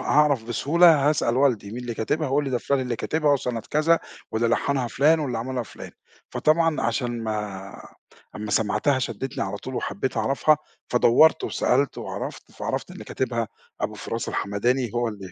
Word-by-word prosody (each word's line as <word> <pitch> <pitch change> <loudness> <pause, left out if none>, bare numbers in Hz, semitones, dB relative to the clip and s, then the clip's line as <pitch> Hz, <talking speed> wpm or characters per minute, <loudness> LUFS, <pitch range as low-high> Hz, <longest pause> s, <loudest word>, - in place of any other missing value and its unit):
هاعرف 145 -6 +3
بسهولة 150 +5 +4
هاسأل 130 -5 +1
والدي 125 -7 +2
مين 120 - -6
اللي 120 -2 -4
كاتبها 150 +8 -1
هيقول 140 +2 +1
لي 135 - -3
دا 125 - +1
فُلان 140 +2 0
اللي 125 -2 -2
كاتبها 150 +5 +1
وسَنَة 125 -4 -1
كذا 160 +2 +3 0.3
واللي 115 +1 +1
لحَّنها 130 +2 +1
فُلان 155 +6 +3
واللي 130 -6 -2
عملها 125 +1 -3
فُلان، - - -10 0.4
فطبعًا 165 0 +2
عشان 120 0 -1
ما 105 -3 -5 0.4
أمّا 105 0 -5
سمعتها 110 +7 +2
شدِّتْني 130 +1 -3
على 100 +1 -4
طول 130 +6 -7
وحبيت 120 +3 -3
أعرفها، 135 +7 +3 0.3
فدوَّرت 125 +6 +5
وسألت 135 +2 +1
وعرفت - - -6
فعرفت - - -4
اللي - - -9
كاتبها 115 -4 -2 0.3
أبو - - -2
فراس - - -4
الحمداني 120 +4 0
هو 120 0 +1
ال 105 -2 -7
125 Hz, 165 wpm, -24 LUFS, 115-145 Hz, 0.4 s, فدوَّرت